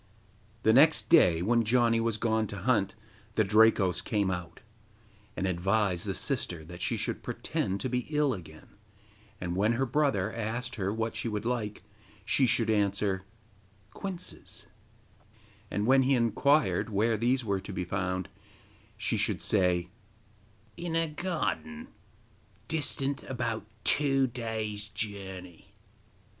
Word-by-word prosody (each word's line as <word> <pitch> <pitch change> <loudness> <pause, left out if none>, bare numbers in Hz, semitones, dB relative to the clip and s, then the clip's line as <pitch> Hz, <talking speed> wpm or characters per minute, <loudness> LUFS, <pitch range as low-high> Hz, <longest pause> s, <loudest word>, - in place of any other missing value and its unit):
The 110 - +5
next 150 +6 +5
day, 90 - +5
when 115 +3 +3
Janni 115 0 +3
was 115 -1 0
gone 110 -1 +1
to 100 - -6
hunt, 100 -1 +1 0.4
the 110 - +4
Drakos 100 -3 +4
came 100 -4 0
out, 90 -2 -5 0.8
and 95 - -1
advised 95 0 +1
the - - -1
sister 80 -2 -2
that 90 +2 -10
she - - 0
should - - -3
pretend 95 +1 -2
to - - -1
be 125 0 -2
ill 150 -3 +2
again, 80 -6 -10 0.7
and 90 -1 -3
when 105 +5 +2
her 130 +3 +1
brother 120 -7 +1
asked 115 +3 -3
her 100 -5 -2
what 110 +1 -2
she - - -2
would 105 -1 -3
like, 115 -4 -2 0.4
she 130 - +3
should 115 -1 +3
answer 100 -2 +1 0.7
'Quinces,' 170 - -6 1.0
and 105 - -1
when 130 +2 +5
he 135 +1 +3
inquired 125 +4 +2
where 110 +2 +2
these 120 +3 +1
were 100 -2 0
to 100 - -8
be 90 -2 -3
found, 90 0 -2 0.7
she - - -1
should - - +1
say: 90 -3 +1 0.9
'In 170 -1 -3
a 165 0 +2
garden 190 +9 -3 0.8
distant 140 -3 -1
about 115 -5 -3 0.2
two 135 -2 +3
days' 110 -4 -4
journey. 95 -4 -7
110 Hz, 135 wpm, -29 LUFS, 95-125 Hz, 1.0 s, The